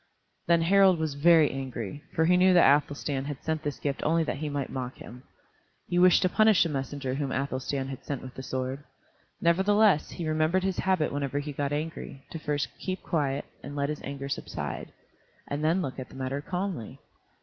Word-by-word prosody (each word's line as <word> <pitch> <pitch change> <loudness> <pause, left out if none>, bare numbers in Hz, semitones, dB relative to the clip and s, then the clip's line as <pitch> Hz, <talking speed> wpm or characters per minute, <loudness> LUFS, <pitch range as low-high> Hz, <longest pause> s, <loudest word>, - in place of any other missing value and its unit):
Then 170 -1 +4
Harald 190 +1 +5
was 160 -2 -2
very 160 +1 +5
angry, 130 0 -5
for 160 - +3
he 180 +2 +5
knew 185 0 +5
that 155 -5 +7
Athelstan 145 -2 -3
had 145 -1 -6
sent 160 -1 -1
this 145 -2 -3
gift 140 -2 -3
only 165 +1 +2
that 145 - -3
he 150 +1 -3
might 140 -2 -3
mock 130 -1 -4
him. 125 +1 -11 0.7
He 175 0 +1
wished 180 +1 +6
to - - +4
punish 215 0 +5
the 170 - -2
messenger 135 -1 -3
whom 140 0 -2
Athelstan 135 0 -2
had 135 0 -7
sent 140 -3 -4
with 130 -1 -9
the - - -7
sword. 130 +1 -4 0.6
Nevertheless 190 +1 +4
he 170 -3 -5
remembered 155 +4 +1
his 190 -1 -1
habit 185 -6 +1
whenever 140 -1 -2
he 145 0 -3
got 140 0 -2
angry, 145 -2 -5
to 165 - -5
first 150 -2 -1
keep 185 -1 -4
quiet 145 -3 -1 0.2
and 145 +1 -8
let 140 0 0
his 150 - -4
anger 140 0 -5
subside, 140 - -5 0.6
and 145 +1 -3
then 170 +4 +2
look 135 -1 -5
at 130 - -7
the - - -14
matter 135 +1 -3
calmly. 180 - -4
145 Hz, 200 wpm, -28 LUFS, 135-170 Hz, 0.7 s, that